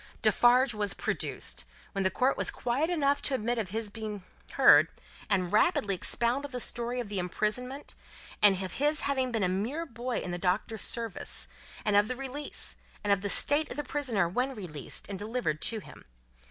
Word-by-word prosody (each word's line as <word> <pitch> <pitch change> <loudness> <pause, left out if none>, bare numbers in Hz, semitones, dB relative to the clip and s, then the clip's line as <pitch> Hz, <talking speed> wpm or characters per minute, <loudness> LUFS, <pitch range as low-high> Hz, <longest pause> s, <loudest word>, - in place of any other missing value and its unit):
Defarge 245 +1 +5
was 210 -1 0
produced, - - -1 0.3
when 195 -2 -1
the 190 - +3
court 255 +8 +2
was - - +1
quiet 260 +7 -1
enough 285 -5 +2
to 275 - -1
admit 240 0 -1
of 205 -5 -3
his 215 +1 -3
being 215 -3 -6 0.3
heard, - - +7 0.4
and 185 -2 +1
rapidly 210 -1 +3
expounded 240 +9 +1
the 250 - -4
story 240 +1 -2
of 240 - -3
the 200 -2 -2
imprisonment, 215 +9 -2 0.5
and 195 -2 +6
of 185 - -4
his 295 +3 +2
having 265 -2 0
been 225 -4 0
a - - +3
mere 225 - -2
boy 245 -2 -4
in 180 - -3
the 175 - -3
Doctor's 195 +4 -1
service, 230 -4 -3 0.4
and 210 -1 +2
of 205 +1 +5
the 255 - -2
release, 270 +3 -5 0.3
and 205 -1 +4
of 195 - 0
the 205 - -2
state 295 +8 +3
of - - -7
the 295 - -1
prisoner 250 -10 0
when 250 +9 -1
released 165 - -6
and 200 -2 -5
delivered 210 -8 -2
to 230 - +3
him. - - -13
225 Hz, 190 wpm, -30 LUFS, 200-260 Hz, 0.5 s, heard